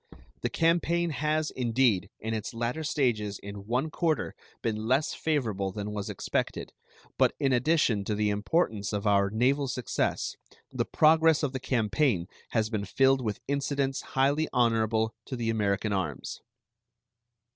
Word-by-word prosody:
The - - 0
campaign 170 0 +2
has, 155 +1 0
indeed, 120 -6 +1
in 110 +1 -3
its 110 +2 -4
latter 120 +7 -2
stages 115 -9 0
in 100 0 -9
one 130 +7 0
quarter 160 0 0 0.3
been 110 -1 -2
less 135 +5 +2
favorable 110 -11 -1
than 105 +1 -5
was 105 -1 -4
expected, - - -3 0.5
but - - +4
in 135 -3 +2
addition 125 -5 +2
to 105 - -1
the 105 0 +1
importance 105 - 0
of 105 0 -2
our 100 -1 +3
naval 130 +6 +1
success 125 -2 -1 0.4
the - - -1
progress 160 0 +4
of 140 -2 0
the 130 - -2
campaign 120 - +1 0.2
has 110 -1 0
been 105 -2 -1
filled 135 +6 +3
with 105 -4 -3
incidents 140 -1 -1
highly 140 +4 +1
honorable 115 -2 +2
to 130 - -5
the 115 -2 -1
American 105 -1 0
arms. 85 -9 -3
120 Hz, 145 wpm, -28 LUFS, 105-140 Hz, 0.5 s, but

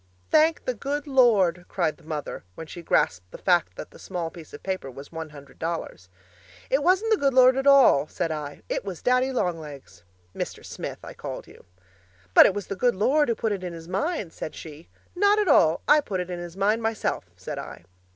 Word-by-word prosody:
'Thank 315 +1 +3
the 255 - 0
good 280 +6 -3
Lord!' 215 - +3
cried 170 -5 -1
the - - -22
mother, 155 - -5
when 160 - -7
she 170 +2 -9
grasped 90 - 0
the - - -10
fact 175 -2 +1
that - - -8
that - - -15
small 175 -3 -4
piece 165 -3 -12
of - - -11
paper 185 -8 -3
was 135 +2 -11
one 160 -1 -6
hundred 145 -1 -14
dollars. 160 - -5 0.6
'It 270 +2 +3
wasn't 375 +8 +2
the 440 - +4
good 275 -2 +1
Lord 255 0 +7
at 270 +1 -1
all,' 270 - +6
said 165 0 -3
I, 150 -2 -6
'it - - -2
was 190 -4 -7
Daddy 255 +1 +2
Long 180 -10 -1
Legs.' 140 - -11 0.3
(Mr. - - -5
Smith, - - -6
I - - -9
called - - -7
you.) - - -17 0.7
'But - - +9
it 195 - -1
was 205 -2 -4
the 200 - -5
good 240 +4 +2
Lord 275 +8 +2
who 230 - +1
put 220 - -1
it 195 -2 -3
in 180 -1 -5
his 165 -1 -10
mind,' 200 - -2
said 155 - -7
she. 155 +1 -11 0.3
'Not 405 +3 +4
at 420 -2 +1
all! 160 - +4
I 300 - +6
put 195 -9 -4
it 180 0 -4
in 175 - -4
his 175 +1 -8
mind 210 +4 +2
myself,' 225 -1 -2
said - - -6
I. - - -9
185 Hz, 220 wpm, -25 LUFS, 160-260 Hz, 0.7 s, But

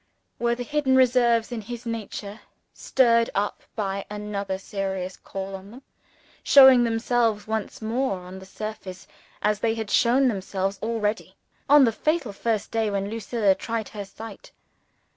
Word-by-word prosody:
Were 235 0 +1
the 245 - -5
hidden 275 0 +1
reserves 240 -3 +3
in 235 -2 -4
his 240 +3 -8
nature 215 -2 -5 0.3
(stirred 235 -3 +3
up 205 +1 -1
by 200 -2 -2
another 205 -2 -4
serious 190 -1 -4
call 195 0 -7
on 190 +1 -10
them) 245 +5 -12 0.6
showing 265 -3 +8
themselves 225 -2 +1
once 220 0 -4
more 230 -1 -1
on 180 +1 -10
the 190 - -13
surface 210 -3 -7 0.4
as 210 -1 +1
they 225 0 0
had 220 -2 -5
shown 260 +3 +4
themselves 195 -2 -2
already, 220 -1 -2 0.3
on 290 0 +8
the 235 - +4
fatal 305 -2 -1
first 220 +1 -2
day 225 -1 0
when 200 0 -2
Lucilla 225 -2 +1
tried 225 +2 -4
her 205 -1 -6
sight? 220 +1 -11
220 Hz, 150 wpm, -25 LUFS, 200-235 Hz, 0.6 s, showing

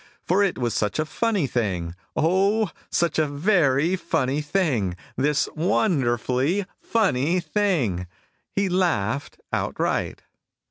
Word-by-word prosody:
For 185 +4 +2
it 195 - 0
was 120 -2 -1
such 105 - -1
a 155 - +1
funny 210 0 0
thing, 95 -10 -2 0.2
O, 195 +4 +2 0.2
such 170 -1 +1
a 155 - +3
very 155 0 +2
funny 140 -5 0
thing, 145 - 0 0.2
This 145 +3 +1
wonderfully 155 - +1 0.2
funny 180 - +1
thing, 155 - 0 0.4
He 200 0 0
Laughed 145 - 0
Outright. - - -1
155 Hz, 110 wpm, -24 LUFS, 125-190 Hz, 0.4 s, a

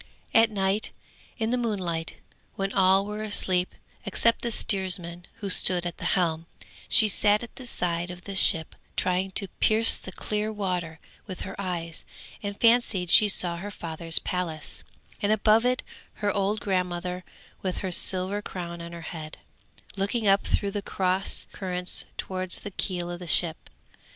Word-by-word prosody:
At 225 0 +5
night, 195 0 0 0.5
in 225 -1 -1
the 250 - 0
moonlight, 180 -8 -3 0.4
when 195 0 -2
all 190 0 +4
were 210 +1 -5
asleep, 185 -4 0 0.3
except 230 0 +1
the 235 - -2
steersman 180 -4 0
who 200 - -3
stood 180 -1 +3
at 175 - -4
the - - -6
helm, 165 -2 -1 0.4
she 220 - +6
sat 210 +1 +3
at 235 - -11
the 255 -2 -6
side 175 -4 -1
of 180 0 -9
the 200 - -7
ship 165 -4 +4 0.2
trying 185 +1 0
to 195 - +3
pierce 220 +1 +6
the 185 - -9
clear 210 +3 -3
water 180 -6 -3 0.3
with 185 -3 -7
her 190 - -6
eyes, 170 -3 -4 0.4
and 205 -1 -6
fancied 230 -7 +3
she 210 - +8
saw 175 -3 +1
her 195 +4 -6
father's 165 -3 +3
palace, 165 -4 -1 0.4
and 205 - +1
above 215 +2 +3
it 255 0 0 0.3
her 205 -1 -1
old 205 +1 -1
grandmother 180 -1 -2 0.4
with 185 -2 -3
her 185 - -2
silver 185 +3 0
crown 170 -4 -6
on 170 0 -9
her 170 - -8
head, 160 -2 -8 0.6
looking 205 +4 -1
up 195 0 +3
through 200 -1 0
the 205 0 -3
cross 190 -1 -1
currents 180 -2 0
towards 185 -1 -2
the 205 - -7
keel 175 -2 -3
of 175 - -7
the 180 - -9
ship. 165 -1 +2
185 Hz, 165 wpm, -26 LUFS, 175-205 Hz, 0.6 s, she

